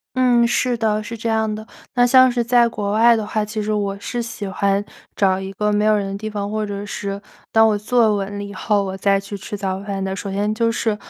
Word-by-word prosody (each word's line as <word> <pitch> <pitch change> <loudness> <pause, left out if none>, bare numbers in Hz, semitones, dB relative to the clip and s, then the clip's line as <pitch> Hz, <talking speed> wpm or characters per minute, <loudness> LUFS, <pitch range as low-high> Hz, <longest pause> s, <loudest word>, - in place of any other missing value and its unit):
嗯， 245 -2 +4
是 245 +1 +1
的， 215 -1 0
是 230 +2 -7
这 230 - -4
样 220 -1 +1
的。 215 0 -8 0.3
那 245 -1 +5
像 255 +1 +6
是 240 -1 0
在 240 0 +4
国 205 -3 -3
外 230 +3 +5
的 220 -2 -2
话 215 0 -1
其 215 0 -4
实 215 +1 -1
我 200 -1 -1
是 240 +3 -3
喜 230 -3 -6
欢 195 +1 0 0.3
找 190 -2 +2
一 190 0 -6
个 210 +2 0
没 210 0 +1
有 215 0 +4
人 195 -1 -3
的 - - -4
地 215 +1 -4
方， 205 -1 -4
或 215 0 -1
者 205 -1 -5
是 200 0 -4 0.3
当 225 0 +5
我 215 - +2
坐 220 +1 +2
稳 200 0 -4
了 205 - -4
以 200 0 -8
后， 205 -1 0
我 190 -1 -4
再 195 +1 +2
去 200 +1 -7
吃 200 +1 -6
早 190 -1 -2
饭 200 -1 -4
的。 190 0 -2
首 200 0 -5
先 205 +2 0
就 230 +1 +1
是， 225 -2 0
210 Hz, 275 characters per minute, -20 LUFS, 200-225 Hz, 0.3 s, 像